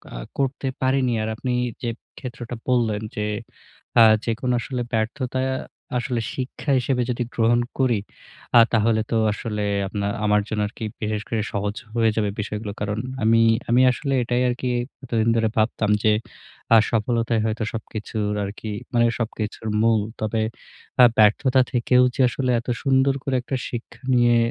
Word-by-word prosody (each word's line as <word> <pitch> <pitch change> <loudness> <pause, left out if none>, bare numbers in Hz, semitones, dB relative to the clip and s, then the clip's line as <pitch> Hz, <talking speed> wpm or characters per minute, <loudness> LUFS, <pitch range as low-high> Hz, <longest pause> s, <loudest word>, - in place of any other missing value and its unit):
আ - - -5 0.2
করতে 135 0 -1
পারিনি। 130 -1 +2
আর 110 - -2
আপনি 125 +3 -3 0.3
যে 120 - -2 0.3
ক্ষেত্রটা 120 -2 -7
বললেন 115 -5 +1
যে 105 - -1 0.7
আ - - +9 0.2
যেকোনো 120 +2 -1
আসলে 125 +1 -3
ব্যর্থতা 125 +4 -1 0.6
আসলে 120 -1 -2
শিক্ষা 130 +2 -3
হিসেবে 125 0 0
যদি 120 0 -1
গ্রহণ 120 +1 +3 0.2
করি, 125 -5 +3 0.6
আ - - +10
তাহলে 110 0 +3
তো 115 - +2 0.2
আসলে 105 -1 -3 0.2
আপনার 100 0 -2
আমার 105 0 +3
জন্য 110 -1 -1
আরকি 110 +1 -7 0.2
বিশেষ 105 -1 -1
করে 115 -2 0
সহজ 100 0 -2 0.2
হয়ে 115 -1 +3
যাবে 105 -2 +1
বিষয়গুলো। 105 0 -4
কারণ 105 0 -2 0.3
আমি 115 +1 +5 0.3
আমি 120 +2 +5
আসলে 135 +3 -2
এটাই 120 +1 0
আরকি 125 +1 -2 0.3
এতদিন 115 -3 +1
ধরে 115 -1 +2
ভাবতাম 110 -1 +1
যে 110 - +5 0.6
আ - - +9
সফলতাই 115 0 +1
হয়তো 110 0 -1
সবকিছুর 110 -1 -3
আরকি 105 +2 -6 0.2
মানে 120 -1 +4
সবকিছুর 110 -1 -4
মূল। 115 -1 +3 0.2
তবে 110 +1 0 0.6
আ - - +10
ব্যর্থতা 125 +5 +5
থেকেও 125 +1 +4
যে - - +1
আসলে 130 +1 -1
এত 120 - -12 0.2
সুন্দর 135 0 +3
করে 135 - -1
একটা 130 +2 -3
শিক্ষা 120 -1 -7
নিয়ে 120 -1 +4
115 Hz, 155 wpm, -23 LUFS, 110-125 Hz, 0.7 s, আ